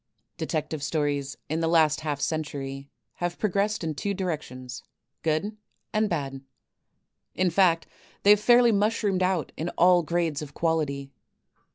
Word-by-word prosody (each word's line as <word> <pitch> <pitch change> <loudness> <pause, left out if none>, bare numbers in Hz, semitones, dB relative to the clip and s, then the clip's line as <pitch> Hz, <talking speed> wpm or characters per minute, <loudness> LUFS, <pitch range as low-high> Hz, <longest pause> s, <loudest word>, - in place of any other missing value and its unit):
Detective 155 -2 -3
Stories 145 -2 -1
in 160 +2 -1
the 165 - +1
last 160 -2 +3
half 150 -2 -2
centur> 140 -3 -3 0.3
have 175 0 -2
progressed 205 0 0
in 160 -1 -1
two 200 +8 -2
directions, 130 - -5 0.4
good 165 +7 0 0.4
and 215 -1 +2
bad. 135 -5 -3 0.9
In 185 -1 +2
fact 170 -2 +3 0.4
they 205 - +7
have 210 - +7
fairly 240 +2 +6
mushroomed 205 -2 +1
out 185 -3 0
in 165 +3 -2
all 180 0 +6
grades 165 -2 -1
of 145 -2 -9
quality. 145 -4 -1
165 Hz, 140 wpm, -26 LUFS, 145-190 Hz, 0.9 s, they